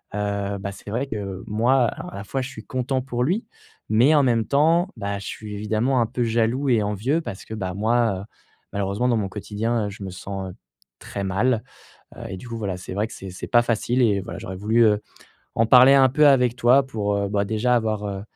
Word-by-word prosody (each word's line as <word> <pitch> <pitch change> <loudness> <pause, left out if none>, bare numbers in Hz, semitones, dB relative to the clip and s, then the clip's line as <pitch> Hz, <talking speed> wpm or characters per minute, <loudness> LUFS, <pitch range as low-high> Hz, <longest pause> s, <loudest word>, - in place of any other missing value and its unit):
heu, 100 -1 -2
bah, 100 0 -4
c'est 100 +1 -11
vrai 130 +5 -1
que, 100 -5 -5
moi, 120 +5 +3
à - - -6
à - - -8
la 100 - -6
fois, 135 +6 -3
je 125 - -4
suis 110 -5 -10
content 130 0 -1
pour 125 -2 -2
lui 190 - 0 0.4
mais 125 +8 +5
en 145 - +5
même 115 -3 +2
temps, 165 +6 +3
bah, 100 -1 -3
je 100 - -8
suis 105 -1 -7
évidemment 110 +5 0
un - - +3
peu 120 +1 -2
jaloux 115 +4 +1
et 115 -3 +3
envieux 105 - 0
parce 95 - -7
que, 110 - -8
bah, 95 -4 -3
moi, 110 -1 +1
heu, - - -8 0.5
malheureusement, 100 +4 -1
dans 120 - +2
mon 100 -3 -2
quotidien, 105 +2 -2
heu, - - -4
je 100 0 -9
me 95 - -5
sens 95 0 -6 0.5
très 100 - -6
mal, 105 +4 +1 0.5
heu - - -11
et 95 - -5
du 120 - -11
coup, 115 - -5
voilà, 100 -4 -3
c'est 90 - -7
vrai 105 +3 0
que - - -13
c'est 95 - -8
c'est 90 - -7
pas 120 - +5
facile 120 +2 0
et 105 -4 +3
voilà, 90 -1 -7
j'aurais 95 0 -6
voulu, 110 +4 +3
heu, 105 -1 +3 0.6
en 115 - +3
parler 130 +3 +8
un 135 -1 +6
peu 150 +3 +5
avec 125 -4 +4
toi 130 +3 +4
pour, 105 -5 -2
heu, 100 -1 -1
bah, 100 0 0
déjà, 110 +4 +1
avoir, 110 -3 -1
heu, 100 -1 -4
110 Hz, 235 wpm, -23 LUFS, 100-125 Hz, 0.6 s, parler